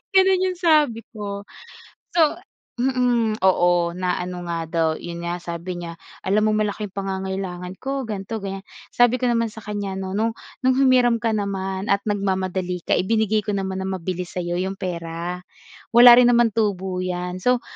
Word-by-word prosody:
Ganun 380 -1 +5
yung 365 - -8
sabi 300 -10 +3
ko, 200 -2 -6 0.7
so 340 - +5 0.6
mm, 245 -4 +1
oo 175 -2 +3
na 180 -1 0
ano 180 0 -6
nga 165 -1 -2
daw 165 0 +1
yun 170 0 -7
nga 175 +1 -2
sabi 170 +1 -5
niya 170 -1 -7 0.3
alam 210 +3 +2
mong 215 - +2
malaking 210 0 -3
pangangailangan 190 -2 -4
ko 270 -2 -3
ganito-gan'yan. 195 -1 -5 0.3
Sabi 245 +1 +4
ko 250 - +1
naman 230 -1 +1
sa 220 - -10
kanya 205 -2 -4
'no, 190 0 -4
"No'ng 225 +1 +1 0.3
no'ng 260 0 +4
humiram 250 -3 +4
ka 225 -2 0
naman 195 -1 -3
at 200 - +2
nagmamadali 190 -3 -1
ka - - +3
ibinigay 215 +1 +1
ko 210 - -2
naman 190 -1 -2
na 190 - -3
mabilis 180 -1 -4
sa'yo 175 -1 -2
'yong 190 +1 -3
pera, 170 0 -4 0.5
wala 240 0 +10
rin 245 - +6
naman 235 -1 +4
tubo 190 -4 -1
'yan, 180 0 -3
so, 250 +5 +2
195 Hz, 165 wpm, -22 LUFS, 180-230 Hz, 0.7 s, wala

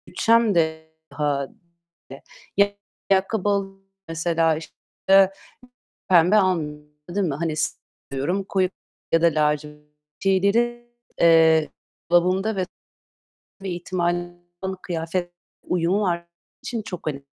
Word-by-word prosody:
Bütçem 230 -3 +3
dâhilinde. 160 -3 -2 1.0
Ya, 200 0 +4 0.4
ayakkabı 195 +1 +2
alı 195 -1 -1 0.3
mesela, 165 0 +1
işte, 190 +4 +2 0.8
pembe 180 +2 +5
al 185 -4 +3 0.5
değil 190 +1 0
mi? 145 - -2
Hani 165 +1 -2 0.6
seviyorum 155 +9 -1
koyu 190 -1 0 0.4
ya 165 - +3
da - - +4
lacivert 150 -1 -1 0.3
şeyleri, 230 +5 +1 0.3
eee, 160 -2 +5 0.4
dolabımda 185 +5 +3
ve 185 -1 -1 1.0
bir 195 - -4
ihtimal 175 0 -2 0.5
kıyafet 175 +1 -3 0.3
uyumu 180 +3 +1
var 170 -3 -1 0.4
için 235 -2 -3
çok 180 -6 -8
önemli, 140 -2 -3
175 Hz, 100 wpm, -23 LUFS, 160-195 Hz, 1.0 s, pembe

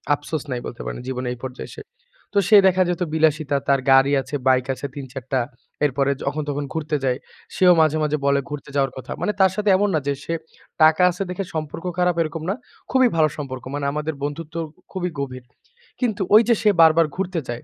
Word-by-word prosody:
আফসোস 145 +1 -5
নাই 125 - -1
বলতে 120 - -7
পারেন - - -5
জীবনে 130 -1 -3
এই 125 - -10
পর্যায়ে 130 -1 -6
এসে। - - -9 0.5
তো 205 - -1
সে 210 - +8
দেখা 185 0 +3
যেত 180 +1 -2
বিলাসিতা 155 -2 +2
তার 140 -1 +4
গাড়ি 135 +1 +6
আছে, 135 +3 -6
বাইক 130 -1 +4
আছে 130 +2 -7
৩ 140 -2 -6
৪ 130 -2 -6
টা। 130 - +3 0.5
এরপরে 140 0 +1
যখন 145 +2 -2
তখন 145 +1 -2
ঘুরতে 155 -1 -2
যায় 125 -1 +1 0.4
সেও 180 -1 +6
মাঝে, 155 0 +3
মাঝে 150 0 0
বলে 140 0 +3
ঘুরতে 145 -1 -7
যাওয়ার 135 -2 +2
কথা। 130 - -8
মানে - - +1
তার 190 -1 +5
সাথে 210 0 0
এমন 205 +1 +1
না 155 - +3
যে 140 - +2
সে 165 - -3 0.5
টাকা 155 +2 +6
আছে 180 - -8
দেখে 180 +2 -3
সম্পর্ক 155 +2 -5
খারাপ 180 -1 +2
এরকম 160 0 -3
না। - - +2 0.4
খুবই 260 -1 +5
ভালো 155 -1 +4
সম্পর্ক। 130 -4 -6
মানে 145 -1 -3
আমাদের 150 +2 -3
বন্ধুত্ব 150 +3 -5 0.4
খুবই 180 -2 -2
গভীর। 130 -2 -5 0.6
কিন্তু 220 -5 -1
ঐ - - +11
যে 235 - +6
সে 215 - +4
বারবার 165 0 +6
ঘুরতে 185 -2 -2
যায়। 120 0 -5
150 Hz, 210 wpm, -22 LUFS, 140-175 Hz, 0.6 s, ঐ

